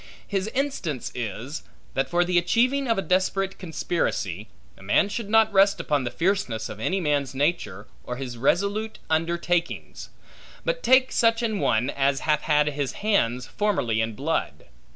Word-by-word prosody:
His 195 -1 -1
instance 225 - -2
is, 120 +5 -5 0.3
that 135 0 0
for 175 +3 +2
the 175 0 +3
achieving 255 +10 +1
of 230 - +2
a 195 - 0
desperate 190 +1 0
conspiracy, 155 - -2 0.3
a - - -18
man 100 - +2
should 205 0 -4
not 220 -1 +4
rest 195 -1 +4
upon 145 -5 0
the - - -1
fierceness 165 - -1
of 105 - -8
any 185 - 0
man's 145 -5 0
nature, 130 - -1 0.2
or 125 - -5
his 125 -2 -6
resolute 200 - 0
undertakings; 170 +2 -1 0.6
but - - -1
take 260 0 +4
such 230 0 +2
an 220 -3 -1
one, 120 -1 +1
as 135 0 +1
hath 150 -1 +1
had 150 -1 +3
his 140 -2 -3
hands 125 - +2
formerly 155 - 0
in 110 -1 -2
blood. 160 +7 -2
170 Hz, 160 wpm, -25 LUFS, 130-200 Hz, 0.6 s, not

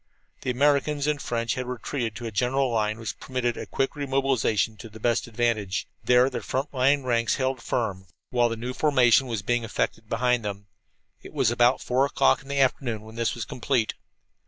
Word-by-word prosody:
The - - -3
Americans 145 +2 +2
and 150 -2 0
French 115 -1 -1
had 125 -1 -4
retreated 125 -2 -3
to 120 - -7
a 115 - -4
general 125 +4 +1
line 110 -1 0
which 115 -1 -6
permitted 125 -2 -2
a - - -6
quick 135 +3 -1
re 145 -1 -4
mobilization 130 -5 +1
to 115 - -10
the 110 +1 -12
best 120 +3 +1
advantage. 110 -4 -1 0.2
There 125 +1 +5
their - - -3
front 135 +3 -3
line 135 +2 +3
ranks 115 -2 +1
held 130 -2 -1
firm, 100 -7 -2 0.2
while 120 -1 +3
the 115 - -3
new 125 +3 -4
formation 130 -3 +4
was 115 -4 -3
being 120 +2 0
effected 110 0 -2
behind 125 0 +1
them. 100 -1 -5 0.6
It - - -12
was - - +2
about 120 +2 +3
four 125 +2 +1
o'clock - - +3
in 135 - -17
the 140 0 -1
afternoon 125 -4 +1
when 110 0 -12
this 115 0 -1
was 120 - -4
complete. 125 -2 0
120 Hz, 200 wpm, -26 LUFS, 115-135 Hz, 0.6 s, There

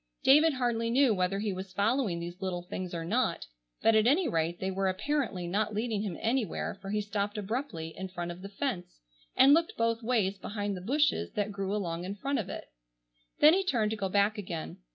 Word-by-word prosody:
David 300 +3 +6
hardly 240 -3 0
knew 255 0 +4
whether 185 0 0
he 205 -1 -1
was 185 0 -7
following 205 -2 +1
these 175 +2 -7
little 180 -2 -3
things 180 0 -5
or 165 -1 -4
not, 225 - 0 0.4
but 225 - +5
at 220 +1 +4
any 320 +7 +3
rate 165 +1 -1
they 190 0 -2
were 195 +1 0
apparently 210 -2 -1
not 205 +4 -1
leading 220 -1 -1
him 195 -6 -4
anywhere 230 -1 -1
for 195 - -7
he 210 +1 0
stopped 205 0 -2
abruptly 205 - -4
in 190 - -5
front 175 -2 -5
of 175 +1 -9
the 195 - -7
fence 195 - -4 0.3
and 275 +2 +7
looked 330 +2 +2
both 230 0 +1
ways 215 -5 0
behind 205 -1 -3
the 180 - -7
bushes 290 +9 +1
that 210 -2 -1
grew 195 0 -2
along 175 -4 -3
in 190 +2 -4
front 275 +7 -1
of 195 - -4
it. - - -7 0.7
Then 305 +2 +9
he 385 +2 +2
turned 230 - +1
to - - -1
go 195 -3 -2
back 205 +3 +2
again. 175 -5 -5
205 Hz, 215 wpm, -30 LUFS, 185-235 Hz, 0.7 s, Then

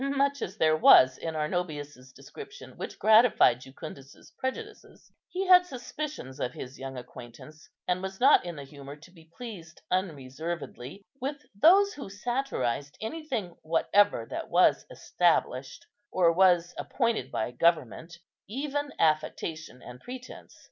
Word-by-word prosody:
Much 280 0 0
as 190 +4 -5
there 155 -4 +3
was 130 -4 +7
in 160 -1 -4
Arnobius's 150 -5 -4
description 400 - -12
which - - -7
gratified 220 - +5
Jucundus's 135 0 -12
prejudices, 420 +12 -7 0.2
he 380 +1 -3
had 365 -1 +7
suspicions 270 - -7
of 125 -2 -2
his 130 +1 -9
young 135 -1 -7
acquaintance, 125 +5 -12 0.2
and 180 0 0
was 190 0 -6
not 275 +3 +6
in 175 -1 -6
the 145 - -8
humour 140 0 -11
to 155 +4 -17
be 165 -3 -19
pleased 185 -10 -9
unreservedly 160 -1 -4 0.2
with 285 +2 -4
those 380 - +5
who 280 -8 -8
satirized 195 - -3
anything 225 - -4
whatever 165 - +2
that - - -6
was - - +3
established, 135 -6 0 0.3
or 170 -2 +3
was 175 -1 +3
appointed 230 - -1
by 110 +2 -2
government, 165 +3 0 0.3
even 285 +4 -3
affectation 155 -2 -1
and 125 0 -11
pretence. 255 0 -10
175 Hz, 135 wpm, -28 LUFS, -, 0.3 s, was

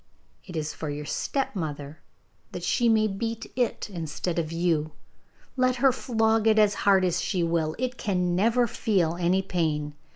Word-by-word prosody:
It 180 - -8
is 155 -1 -2
for 155 - -5
your 145 +1 -5
stepmother, 155 - -3 0.5
that 175 - -6
she 235 +6 +2
may 220 -1 +4
beat 225 +3 -4
it 245 -2 -1
instead 165 -2 -3
of 160 -1 -3
you. 165 -3 0 0.6
Let 255 -1 +2
her 265 +2 +4
flog 225 -3 +1
it 220 0 +4
as 210 -1 +5 0.2
hard 190 -1 +5
as 175 -1 0
she 180 -4 -1
will, 165 -2 0
it 255 0 -3
can 180 -3 0
never 230 +6 +3
feel 190 -7 0
any 180 +2 +1
pain. 155 -5 -1
180 Hz, 165 wpm, -26 LUFS, 160-225 Hz, 0.6 s, as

